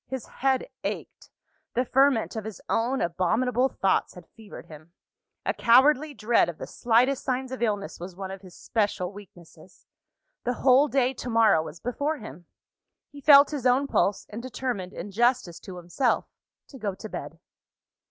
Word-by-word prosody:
His 260 -3 -5
head 265 - -1 0.2
ached; - - -6 0.5
the 250 +2 +1
ferment 265 -3 +2
of 220 - -4
his 220 -1 -8
own 245 +4 0
abominable 235 +9 +1
thoughts 195 -6 0
had 180 -2 -12
fevered 220 -3 -11
him. 155 +2 -14 0.5
A - - +1
cowardly 280 +5 +4
dread 220 -3 +2
of 170 - -7
the - - -6
slightest 245 +3 +1
signs 260 0 -2
of 260 - -6
illness 205 -4 -2
was 175 +1 -8
one 190 0 -6
of 195 -1 -8
his 185 -3 -14
special 205 -4 -1
weaknesses. 185 -3 -16 0.6
The 245 - 0
whole 265 +4 +4
day, 265 -2 +1
to 250 - -7
morrow, 225 -8 +4
was 160 +1 -9
before 285 - -2
him. 170 - -11 0.6
He 285 - -12
felt 280 +1 +7
his 275 -4 -1
own 255 +3 +3
pulse; 205 -7 0
and 220 +3 -6
determined, 245 -7 -4
in 200 +4 -7
justice 235 -5 +1
to 185 -2 -10
himself, 175 +9 0 0.4
to 270 - -12
go 200 -4 -3
to 220 - -8
bed. - - -8
230 Hz, 170 wpm, -26 LUFS, 190-260 Hz, 0.6 s, felt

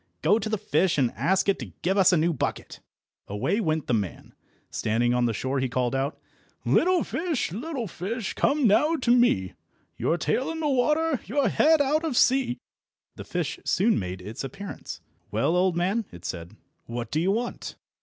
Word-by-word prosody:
Go 200 +8 +4
to 220 - -3
the 215 - 0
fish, 175 -1 +1
and 130 -4 +2
ask 190 +2 +1
it 200 - +2
to 110 -10 -8
give 190 +2 +1
us 195 -2 +5
a 180 - +4
new 165 +2 +2
bucket." 135 - -4 0.5
Away 105 - -1
went 155 -5 0
the - - -1
man. 100 -7 -3 0.4
Standing 120 +3 +1
on 125 0 +2
the - - 0
shore 130 +5 -2
he 130 -1 -1
called 125 0 0
out— 135 +3 -1 0.5
"Little 365 0 +3
fish, 325 - -2
little 250 - -4
fish, 195 +5 -4
come 285 -1 +2
now 300 +10 +4
to 250 -5 +1
me, 95 - +2 0.4
Your 170 - +1
tail 260 - 0
in 325 0 -4
the 310 - 0
water, 300 +2 +2
your 265 +2 +1
head 315 +8 +4
out 300 +4 +1
of 300 -7 -1
sea!" 255 -1 +3 0.6
The - - -8
fish - - -3
soon 220 +4 +2
made 90 -1 -5
its 105 +6 -6
appearance. 195 +8 -7 0.3
"Well, 165 - +1
old 180 -1 +2
man," 195 +6 0
it 90 0 -12
said, 85 +3 -6 0.3
"what 115 -1 -5
do 155 - +1
you 185 +3 +2
want?" 235 +4 -3
190 Hz, 190 wpm, -26 LUFS, -, 0.6 s, us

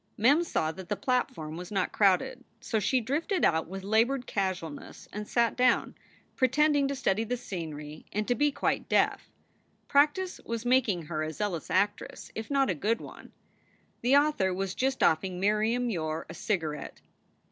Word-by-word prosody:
Mem 280 +10 +4
saw 160 - -1
that 180 +2 -10
the - - 0
platform 250 - -1
was 180 +2 -8
not 195 -3 0
crowded. 200 +5 +2 0.2
So 220 - -1
she 255 +5 +2
drifted 310 - 0
out 160 -1 +2
with 190 +2 -7
labored 235 +6 +2
casualness 185 -6 -4
and 210 0 -6
cat 235 -1 +2
down, 250 -1 +2 0.4
pretending 285 +2 +3
to 280 - -2
study 220 -5 +1
the 245 +3 -2
scenery 155 -8 -7
and 210 +1 -2
to 245 - +3
be 290 +3 +2
quite - - -1
deaf. - - +2 0.6
Practice 300 +6 +2
was 230 0 -4
making 245 -8 +2
her 155 0 -3
a 155 0 -2
zealous 175 0 -3
actress, 200 +2 -1
if 220 - -6
not 275 -4 +2
a - - +1
good 210 +9 0
one. - - -11 0.7
The 255 +4 +5
author 285 -11 +2
was 190 +1 -2
just 265 +3 0
offering 180 +3 +2
Miriam 220 +5 +1
Yore 160 -4 -3
a - - -8
cigarette. 160 -6 -3
215 Hz, 170 wpm, -29 LUFS, 180-260 Hz, 0.7 s, The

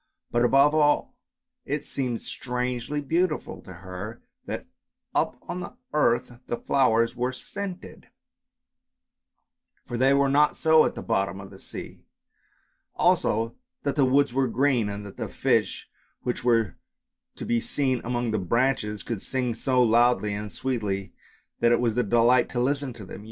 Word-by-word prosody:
But 120 0 +2
above 135 +4 +5
all 150 -1 +2 0.5
it 145 +1 -3
seemed 125 -4 -2
strangely 125 +3 -3
beautiful 165 +2 -1
to - - -12
her 95 +4 -8 0.2
that - - -4 0.5
up - - 0
on 180 - -4
the 175 - -7 0.2
earth 120 -4 +1
the 120 - -2
flowers 115 -4 +2
were 125 +1 -1
scented, 185 +7 -7 1.8
for 120 - -4
they 135 +1 +5
were 140 0 +3
not 145 +2 +3
so 160 -1 +5
at - - -2
the - - -6
bottom 95 -4 0
of 95 0 -10
the 95 - -13
sea; - - -7 0.9
also 115 +2 +2 0.3
that 140 - -1
the 145 - +3
woods 135 0 +3
were 135 0 +2
green, 125 -3 +1
and 100 0 -6
that 100 - -11
the - - -4
fish - - 0 0.4
which 125 - -2
were 115 -4 +2 0.6
to - - -7
be 120 -1 +1
seen 130 -4 0
among 120 -1 -1
the 110 - 0
branches 105 +1 0
could 115 -5 -4
sing 125 -3 -1
so 125 +2 +2
loudly 120 -2 +3
and 105 0 -5
sweetly 105 -7 -3 0.5
that 120 0 +4
it 120 - +4
was 115 -3 +1
a 125 - +3
delight 120 +2 +4
to 120 - -2
listen 140 +2 0
to 110 -4 -10
them. 95 - -9
120 Hz, 160 wpm, -26 LUFS, 115-135 Hz, 1.8 s, above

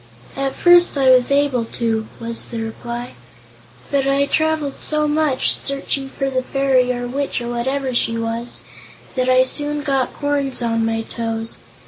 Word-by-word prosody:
"At 275 0 -2
first 350 -3 +5
I 265 -1 +5
was 255 +1 +4
able 280 -4 +2
to," 225 -1 -2
was 230 0 -3
the 230 - -4
reply; 235 +2 -5 0.8
"but 275 -1 +1
I 275 +1 +3
traveled 315 -1 -1
so 305 0 +2
much, 300 -3 +2
searching 275 -1 -2
for 275 0 -3
the 255 -1 0
fairy, 260 -1 +2
or 245 0 -3
witch, 275 +2 -2
or 240 0 -5
whatever 260 +2 -2
she 230 -1 +2
was, 230 +1 -4 0.5
that 255 -1 0
I 255 0 +6
soon 290 +2 0
got 270 -3 0
corns 285 -3 -1
on 230 -1 +1
my 225 0 -1
toes. 225 0 -5
260 Hz, 160 wpm, -20 LUFS, 235-280 Hz, 0.8 s, I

